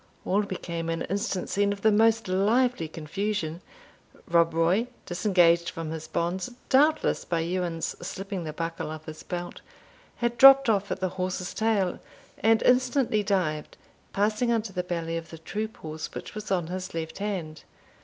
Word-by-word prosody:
All 200 +3 +2
became 170 -4 -4
an 165 0 -1
instant 200 0 -2
scene 200 0 +1
of 200 -1 -5
the 220 - +5
most 225 +1 +3
lively 210 +1 +2
confusion. 170 +2 -3 0.7
Rob 170 0 +4
Roy, 170 +8 +2 0.2
disengaged 175 -2 +3
from 165 -1 -5
his 160 -1 -6
bonds, 180 +7 -2 0.2
doubtless 300 +4 +3
by 170 -2 -1
Ewan's 170 -1 -2
slipping 195 +1 -5
the 155 - -4
buckle 165 0 -4
of 155 0 -7
his 155 0 -8
belt, 175 0 -6 0.5
had 240 0 -2
dropped 270 -1 +9
off 200 -1 0
at 190 - -3
the 185 - +1
horse's 185 0 -2
tail, 215 -5 +1 0.4
and 225 +1 +3
instantly 250 -3 +3
dived, 180 -7 -1 0.3
passing 215 +4 +1
under 225 -3 -1
the 180 - -1
belly 165 -2 -3
of 165 0 -7
the 165 - -9
troop 215 +7 -5
horse 155 0 -6
which - - -7
was 215 -1 -7
on 180 -4 +1
his 185 +1 -5
left 160 +2 -4
hand. 180 -7 -4
185 Hz, 165 wpm, -27 LUFS, 165-215 Hz, 0.7 s, dropped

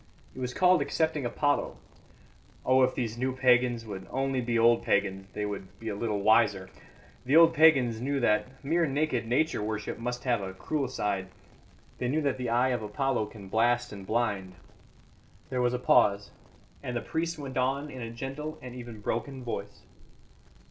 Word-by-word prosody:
It - - -10
was 125 -1 -3
called 185 0 +4
accepting 160 -5 0
Apollo. 145 +4 0 0.9
Oh, 130 0 +4
if 130 0 +2
these 115 -2 -3
new 130 0 -1
pagans 125 -2 +3
would 95 -3 -7
only 135 -1 -1
be 120 -1 0
old 115 +1 +5
pagans, 95 -1 0
they 105 - -2
would 100 -2 -6
be 115 - -5
a 105 - -3
little 105 -2 -2
wiser! 100 -4 +3 0.5
The 130 +4 +1
old 165 0 +7
pagans 135 -8 +4
knew 140 +2 -1
that 125 +3 0
mere 165 +3 +2
naked 140 -4 -1
Nature 130 +2 +1
worship 110 0 -4
must 120 +1 -4
have 120 -5 +1
a 95 -1 -6
cruel 145 +6 -2
side. 100 -6 -2 0.7
They 125 - -1
knew 150 +5 0
that 140 -2 0
the 125 -2 -2
eye 120 +3 +3
of 125 -3 -1
Apollo 110 +1 -1
can 105 -2 -11
blast 120 +4 +1
and 100 -2 -9
blind." 100 -5 -1 1.0
There 125 -1 0
was 125 0 +1
a - - 0
pause, 100 -5 +3 0.5
and 125 -1 -3
the - - -2
priest 165 0 -2
went 135 -3 -6
on 140 +3 -1
in 130 - -8
a 115 - -5
gentle 135 +6 -6
and 125 -1 -9
even 120 -3 -9
broken 130 +5 -3
voice. 120 - -6
120 Hz, 180 wpm, -28 LUFS, 110-135 Hz, 1.0 s, old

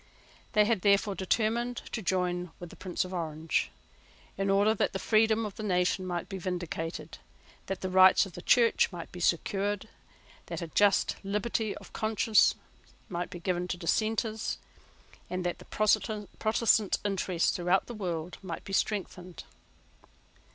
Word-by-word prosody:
They 210 0 +5
had 220 -3 +1
therefore 200 +1 +3
determined 230 +5 0
to 225 - -3
join 180 -1 -1
with 175 -1 -9
the - - -12
Prince 185 -1 -2
of 185 - -8
Orange, 160 -2 -1 0.7
in 195 0 -1
order 200 +2 +4
that - - 0
the - - -1
freedom 220 +2 +3
of 205 - -7
the - - -5
nation 185 -2 +1
might 175 -1 -3
be 195 -2 -6
vindicated, 175 -3 -4 0.5
that 195 - -4
the 185 - -2
rights 185 +2 +7
of 190 - -11
the 175 - -8
Church 230 +2 +4
might 175 -2 -8
be 180 - -8
secured, 200 +4 0 0.6
that - - -4
a 170 - -4
just 205 +3 +3
liberty 210 +2 -1
of - - -14
conscience 220 0 +3 0.5
might 175 -1 -3
be 175 -1 -8
given 180 0 -1
to 180 - -3
Dissenters, 220 +5 -1 0.7
and 180 0 -3
that 175 - -2
the - - -13
Protestant 215 0 +1
interest 185 -3 0
throughout 180 +2 +2
the 240 - -8
world 180 -5 -4
might 175 -4 -6
be 195 - -8
strengthened. 185 -3 -2
195 Hz, 155 wpm, -29 LUFS, 180-215 Hz, 0.7 s, rights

